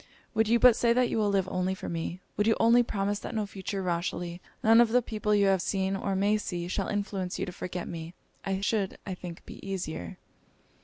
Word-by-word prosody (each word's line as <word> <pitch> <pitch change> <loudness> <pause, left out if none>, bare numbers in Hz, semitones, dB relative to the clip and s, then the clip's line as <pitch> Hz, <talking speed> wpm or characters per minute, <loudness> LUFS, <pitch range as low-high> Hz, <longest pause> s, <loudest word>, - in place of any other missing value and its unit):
Would 220 -1 +2
you 235 +2 +4
but 240 0 +7
say 235 0 +3
that 250 0 +2
you - - 0
will 210 -1 +2
live 195 -2 +1
only 185 0 -1
for - - -7
me 170 +2 -4
would 210 - +1
you 225 - +4
only 230 +2 +6
promise 205 -3 -1
that - - -6
no 215 -1 0
future 195 0 -4
Rochely, 175 0 -2 0.2
none 225 +2 +7
of 235 - +4
the 250 +2 +4
people 210 -2 0
you 200 -1 +4
have 195 -2 +3
seen 190 0 0
or 195 0 -1
may 205 +2 +3
see, 175 -4 -4
shall 190 +1 -2
influence 200 -3 -2
you - - -1
to - - -6
forget 180 0 -5
me 165 +1 -7 0.3
I 195 0 -2
should, 200 -2 0
I 190 - -3
think, 175 -2 -9
be - - -11
easier!' 175 - -4
195 Hz, 225 wpm, -29 LUFS, 180-215 Hz, 0.3 s, but